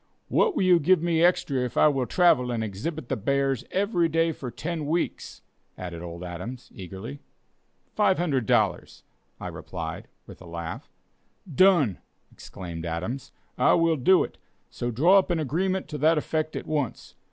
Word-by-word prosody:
"What 450 Hz, -7 st, +2 dB
will 200 Hz, -, +1 dB
you 180 Hz, -2 st, +5 dB
give 180 Hz, +3 st, +4 dB
me 170 Hz, -1 st, +2 dB
extra 165 Hz, -6 st, +2 dB
if 125 Hz, -1 st, -3 dB
I -, -, +6 dB
will 135 Hz, -4 st, 0 dB
travel 150 Hz, -9 st, +3 dB
and 115 Hz, -2 st, -1 dB
exhibit 120 Hz, -, -5 dB
the 135 Hz, -, -1 dB
bears 135 Hz, +3 st, 0 dB
every 190 Hz, -4 st, +1 dB
day 165 Hz, +1 st, +2 dB
for 135 Hz, -5 st, -6 dB
ten 160 Hz, +3 st, -4 dB
weeks?" 170 Hz, +3 st, -3 dB, 0.3 s
added 85 Hz, -2 st, -6 dB
old 85 Hz, 0 st, -7 dB
Adams, 90 Hz, +9 st, -7 dB
eagerly. 95 Hz, +8 st, -8 dB, 0.7 s
"Five 205 Hz, -3 st, +3 dB
hundred 140 Hz, -10 st, 0 dB
dollars," -, -, 0 dB, 0.4 s
I -, -, -7 dB
replied, -, -, -6 dB, 0.2 s
with -, -, -13 dB
a 90 Hz, -, -11 dB
laugh. 85 Hz, 0 st, -6 dB, 0.6 s
"Done!" 160 Hz, -, +4 dB, 0.3 s
exclaimed 85 Hz, -3 st, -8 dB
Adams, 100 Hz, +11 st, -4 dB, 0.3 s
"I -, -, +5 dB
will 165 Hz, -1 st, +3 dB
do 180 Hz, +7 st, +4 dB
it, -, -, -9 dB, 0.3 s
so 120 Hz, -, -3 dB
draw 165 Hz, -, +5 dB
up 190 Hz, -, -2 dB
an 175 Hz, -, +1 dB
agreement 180 Hz, +6 st, -1 dB
to 150 Hz, -3 st, -5 dB
that 160 Hz, +3 st, +4 dB
effect 155 Hz, +1 st, -2 dB
at -, -, -4 dB
once. 145 Hz, -6 st, -3 dB
145 Hz, 165 wpm, -26 LUFS, 115-170 Hz, 0.7 s, I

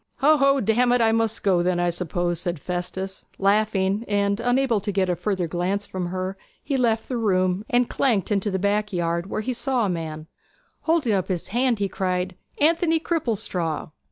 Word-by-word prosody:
'Ho, 300 Hz, +3 st, +5 dB
ho! 275 Hz, 0 st, +4 dB
damn 240 Hz, +2 st, +2 dB
it, 245 Hz, -, +3 dB
I 225 Hz, -1 st, +4 dB
must 225 Hz, 0 st, 0 dB
go 185 Hz, -3 st, +3 dB
then, 175 Hz, 0 st, +1 dB
I 175 Hz, 0 st, +2 dB
suppose,' 175 Hz, 0 st, -2 dB
said 175 Hz, -1 st, -2 dB
Festus, 180 Hz, +4 st, -4 dB
laughing; 200 Hz, 0 st, +2 dB
and 200 Hz, 0 st, +1 dB
unable 245 Hz, -1 st, +2 dB
to 205 Hz, +1 st, -3 dB
get 185 Hz, -2 st, +1 dB
a -, -, 0 dB
further 190 Hz, -2 st, -1 dB
glance 180 Hz, +5 st, -1 dB
from 185 Hz, -3 st, -4 dB
her 185 Hz, +2 st, -3 dB, 0.3 s
he 280 Hz, -, -1 dB
left 230 Hz, -3 st, +1 dB
the 250 Hz, -, -2 dB
room 185 Hz, -3 st, +1 dB
and 245 Hz, 0 st, +3 dB
clanked 225 Hz, -8 st, 0 dB
into 205 Hz, 0 st, +1 dB
the 190 Hz, -, -1 dB
back 205 Hz, +2 st, 0 dB
yard, 170 Hz, -1 st, -1 dB
where 215 Hz, -, -2 dB
he 255 Hz, +4 st, -2 dB
saw 250 Hz, -1 st, 0 dB
a -, -, 0 dB
man; 160 Hz, -3 st, -4 dB, 0.6 s
holding 315 Hz, -9 st, +3 dB
up 190 Hz, -2 st, 0 dB
his 180 Hz, -3 st, -3 dB
hand 245 Hz, +2 st, +1 dB
he 200 Hz, -1 st, 0 dB
cried, 185 Hz, -1 st, -2 dB, 0.2 s
'Anthony 325 Hz, +1 st, +3 dB
Cripplestraw!' 215 Hz, -, -2 dB
200 Hz, 190 wpm, -24 LUFS, 180-235 Hz, 0.6 s, Ho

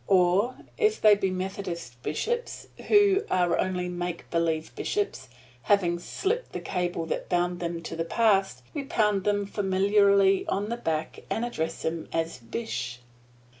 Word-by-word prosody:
Or 190 Hz, +6 st, +3 dB, 0.2 s
if 430 Hz, -1 st, +3 dB
they 215 Hz, -1 st, +7 dB
be 195 Hz, -2 st, +1 dB
Methodist 185 Hz, -9 st, -5 dB
bishops, 475 Hz, -, -3 dB, 0.2 s
who 410 Hz, -1 st, +5 dB
are 180 Hz, -2 st, +2 dB
only 180 Hz, -1 st, -1 dB
make 175 Hz, -1 st, -4 dB
believe 165 Hz, -2 st, 0 dB
bishops, 130 Hz, -11 st, -2 dB, 0.3 s
having 175 Hz, -2 st, +2 dB
slipped 425 Hz, -, -2 dB
the -, -, -3 dB
cable 175 Hz, -3 st, -2 dB
that -, -, -3 dB
bound 175 Hz, 0 st, +1 dB
them 170 Hz, -1 st, -3 dB
to 165 Hz, -, -5 dB
the 165 Hz, -, -1 dB
past, 195 Hz, -, +2 dB
we 290 Hz, -, -2 dB
pound 210 Hz, -7 st, +1 dB
them 205 Hz, -1 st, +1 dB
familiarly 200 Hz, 0 st, +3 dB
on 205 Hz, +2 st, -1 dB
the 235 Hz, -, -2 dB
back 160 Hz, -8 st, -2 dB
and 230 Hz, -, -1 dB
address 165 Hz, -9 st, -3 dB
them 160 Hz, 0 st, -2 dB
as 165 Hz, -4 st, -2 dB
"Bish." 120 Hz, +1 st, -4 dB
185 Hz, 150 wpm, -27 LUFS, 165-205 Hz, 0.3 s, they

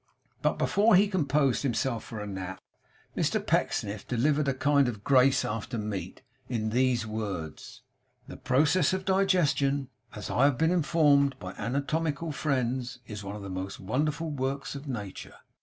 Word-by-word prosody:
But -, -, +1 dB
before 210 Hz, +1 st, +4 dB
he 200 Hz, +3 st, +5 dB
composed 150 Hz, -, +1 dB
himself 125 Hz, -3 st, -1 dB
for 110 Hz, -, -7 dB
a -, -, -4 dB
nap, 95 Hz, -2 st, -6 dB, 0.6 s
Mr -, -, +1 dB
Pecksniff 100 Hz, 0 st, -1 dB
delivered 140 Hz, +4 st, +1 dB
a 135 Hz, -, +2 dB
kind 140 Hz, 0 st, +3 dB
of 105 Hz, -4 st, -5 dB
grace 130 Hz, 0 st, +4 dB
after 115 Hz, +2 st, -3 dB
meat, 100 Hz, -4 st, -5 dB, 0.3 s
in 110 Hz, -3 st, -1 dB
these 125 Hz, -1 st, +2 dB
words: 100 Hz, -8 st, -6 dB, 0.4 s
'The -, -, -9 dB
process 150 Hz, +6 st, +2 dB
of 190 Hz, 0 st, -2 dB
digestion, 160 Hz, -8 st, +2 dB, 0.3 s
as 105 Hz, -, -6 dB
I 130 Hz, -, +4 dB
have 140 Hz, -3 st, +3 dB
been 160 Hz, +2 st, +2 dB
informed 145 Hz, -5 st, +3 dB
by 95 Hz, -1 st, -7 dB
anatomical 150 Hz, +5 st, -2 dB
friends, 130 Hz, -3 st, -1 dB
is 105 Hz, -3 st, -7 dB
one 100 Hz, +1 st, -6 dB
of 105 Hz, -, -8 dB
the 100 Hz, -, -6 dB
most 95 Hz, +1 st, -5 dB
wonderful 150 Hz, -, -1 dB
works 135 Hz, 0 st, -3 dB
of 140 Hz, +1 st, -8 dB
nature. 105 Hz, -7 st, -6 dB
130 Hz, 155 wpm, -28 LUFS, 110-150 Hz, 0.6 s, he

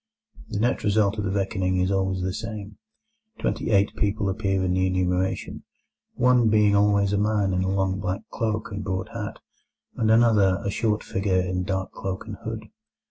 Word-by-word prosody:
The 100 Hz, -, -3 dB
net 120 Hz, +3 st, +1 dB
result 105 Hz, 0 st, +2 dB
of 105 Hz, -, -1 dB
the -, -, 0 dB
reckoning 95 Hz, -1 st, 0 dB
is 90 Hz, +1 st, +1 dB
always 95 Hz, -1 st, 0 dB
the 95 Hz, 0 st, -2 dB
same. 110 Hz, -1 st, -6 dB, 0.6 s
Twenty -, -, -2 dB
eight 100 Hz, -1 st, +3 dB
people 105 Hz, 0 st, 0 dB
appear 95 Hz, -2 st, 0 dB
in 90 Hz, -1 st, +1 dB
the 95 Hz, 0 st, +2 dB
enumeration, 95 Hz, 0 st, -1 dB, 0.5 s
one 125 Hz, -2 st, +4 dB
being 105 Hz, -1 st, +4 dB
always 100 Hz, -1 st, +3 dB
a 100 Hz, -, +2 dB
man 105 Hz, -2 st, +1 dB
in 90 Hz, -, +1 dB
a 95 Hz, -, 0 dB
long 95 Hz, -1 st, 0 dB
black 95 Hz, -1 st, -2 dB
cloak 110 Hz, -1 st, -2 dB
and 100 Hz, 0 st, -4 dB
broad 95 Hz, +2 st, -3 dB
hat, 115 Hz, -3 st, -5 dB, 0.6 s
and 110 Hz, -, +1 dB
another 110 Hz, -5 st, +4 dB
a 100 Hz, -, 0 dB
"short 105 Hz, 0 st, 0 dB
figure 95 Hz, -1 st, 0 dB
in 90 Hz, 0 st, -1 dB
dark 95 Hz, -2 st, -2 dB
cloak 95 Hz, +1 st, -5 dB
and 105 Hz, -1 st, -6 dB
hood". 110 Hz, -1 st, -6 dB
100 Hz, 185 wpm, -25 LUFS, 95-110 Hz, 0.6 s, one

